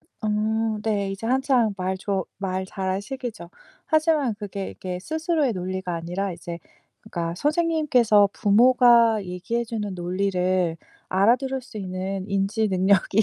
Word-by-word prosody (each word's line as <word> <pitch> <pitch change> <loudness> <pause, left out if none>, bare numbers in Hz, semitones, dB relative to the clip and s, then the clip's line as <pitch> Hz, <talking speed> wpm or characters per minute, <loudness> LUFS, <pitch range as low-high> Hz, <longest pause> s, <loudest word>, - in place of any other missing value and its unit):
어. 215 0 -1
네. 200 -3 0
이제 195 +3 -6
한창 255 -4 +2
말 185 0 -2
좋 195 -1 -2
말 190 -1 -2
잘할 190 0 -2
시기죠. 230 -7 -7 0.4
하지만 310 -6 +2
그게 200 -2 -6
이게 180 -1 -6
스스로의 315 - 0
논리가 185 -1 -3
아니라 180 +4 -3
이제 170 0 -7 0.4
그러니까 170 -1 -4
선생님께서 295 - +3
부모가 235 0 +5
얘기해 180 +7 -3
주는 215 -4 -4
논리를 180 -1 0 0.3
알아들을 250 +8 +2
수 245 -3 -13
있는 190 0 -4
인지 200 +2 0
능력이 190 +2 +3
200 Hz, 295 characters per minute, -24 LUFS, 185-235 Hz, 0.4 s, 부모가